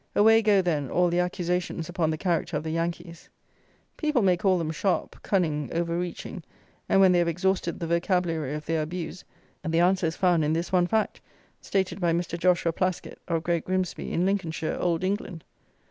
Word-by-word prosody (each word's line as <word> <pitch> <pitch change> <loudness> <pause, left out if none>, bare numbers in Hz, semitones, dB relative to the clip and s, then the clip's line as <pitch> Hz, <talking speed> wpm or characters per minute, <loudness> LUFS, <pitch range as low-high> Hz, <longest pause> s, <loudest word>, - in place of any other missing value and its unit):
Away 225 +2 +6
go, 205 -3 +4
then, 150 -6 -1
all 180 0 +2
the 175 +1 +1
accusations 180 -2 -1
upon 175 -3 0
the 155 - -1
character 170 -2 -1
of 150 - -4
the 160 - -3
Yankees. 170 0 -4 0.7
People 300 -7 +1
may 185 -2 +4
call 185 +1 +2
them 160 -2 -2
sharp, 185 +4 -2
cunning, 155 - 0
overreaching; 170 +1 -3 0.5
and - - +4
when 190 -1 +6
they 175 - +4
have 170 - +2
exhausted 180 0 0
the 170 - -3
vocabulary 170 -4 0
of 150 0 -6
their 160 0 0
abuse, 170 +3 -5 0.4
the 165 +1 +1
answer 180 0 +3
is 160 - -3
found 175 -4 +3
in 150 +1 +1
this 170 +2 -2
one 180 -2 +3
fact, 220 +2 0 0.4
stated 195 0 -1
by 170 -1 +2
Mr. 170 0 -2
Joshua 175 -1 +2
Plaskitt, 185 +1 -2
of 165 -2 -1
Great 170 -2 0
Grimsby, 185 -1 -2
in 175 - +1
Lincolnshire, 170 -5 -1
Old 170 -1 0
England. 185 -4 -3
175 Hz, 185 wpm, -26 LUFS, 165-185 Hz, 0.7 s, Away